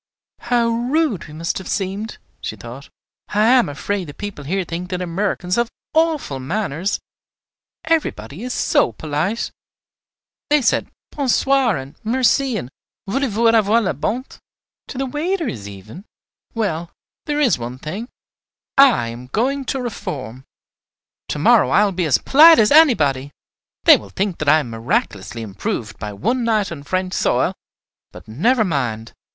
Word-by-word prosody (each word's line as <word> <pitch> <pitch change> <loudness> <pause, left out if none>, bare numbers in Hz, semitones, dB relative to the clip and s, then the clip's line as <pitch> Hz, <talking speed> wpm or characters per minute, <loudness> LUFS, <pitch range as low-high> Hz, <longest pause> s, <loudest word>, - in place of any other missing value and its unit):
"How 240 -1 +1
rude 240 - 0
we 150 - -12
must 165 +3 -2
have 190 - -9
seemed!" 200 +3 -3 0.2
she - - -4
thought. - - -10 0.4
"I 210 +1 +2
am 250 - +4
afraid 190 +6 -3
the 145 - -10
people 205 -9 -7
here 190 +6 -1
think 175 +2 -5
that 180 -2 -3
Americans 180 +1 -1
have 235 -1 +1 0.2
awful 315 - +1
manners, 175 +4 -2 0.8
everybody 190 - -1
is 250 +1 -4
so 120 - +2
polite. 155 - -2 1.0
They 295 -2 +3
said 225 - +1 0.2
'Bon 280 -3 -2
soir' 265 - +3
and 135 +1 -8
'Merci' 255 +2 +2
and 130 -9 -6 0.3
'Voulez 270 +8 0
vous 230 +3 +2
avoir 220 0 +4
la 205 -5 0
bonté,' 235 - -4 0.5
to - - -8
the 270 - -1
waiters 295 - -3
even! 105 - -11 0.5
Well, 170 -7 -2 0.4
there 295 0 0
is 245 - +3
one 120 +2 -6
thing, 195 - -6 0.7
I 250 - +6
am 120 +2 -9
going 265 - -1
to 265 - -2
reform. 135 - -6 0.8
To - - -3
morrow - - +4
I 205 +9 +4
will 200 - 0
be 180 -2 -1
as 145 -5 +3
polite 320 +4 +7
as 210 -1 +4
anybody. 150 - +4 0.5
They - - +8
will 100 - -12
think 190 - -2
that 155 - +1
I 155 +1 +5
am 120 - -8
miraculously 115 -2 -2
improved 105 +1 -4
by 105 -1 -5
one 240 - -1
night 215 -4 +1
on 155 -4 -6
French 185 +5 -2
soil; - - +1 0.6
but, - - -13
never 220 - +2
mind! 125 - -2
195 Hz, 155 wpm, -20 LUFS, -, 1.0 s, They